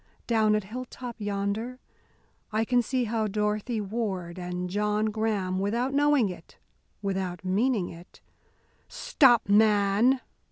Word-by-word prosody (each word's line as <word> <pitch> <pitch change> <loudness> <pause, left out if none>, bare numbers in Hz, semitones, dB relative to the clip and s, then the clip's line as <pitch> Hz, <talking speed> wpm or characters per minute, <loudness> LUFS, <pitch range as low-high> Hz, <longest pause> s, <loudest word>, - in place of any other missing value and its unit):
Down 220 -2 +3
at 210 - 0
Hilltop 245 +2 -7
yonder 205 +4 -2 0.7
I 220 +1 +1
can 245 +1 +3
see 255 +2 -1
how 220 -1 -1
Dorothy 210 +3 -1
Ward 195 -4 -3
and 180 0 -4
John 210 +3 0
Graham, 205 -4 -1
without 235 +7 -1
knowing 290 -4 +3
it, 175 -3 -10 0.5
without 190 -2 -3
meaning 205 +1 +1
it 170 +2 -13 0.4
" - - -39 0.2
"Stop, 270 - +3
man!" 210 +4 +4
210 Hz, 125 wpm, -27 LUFS, 195-235 Hz, 0.7 s, man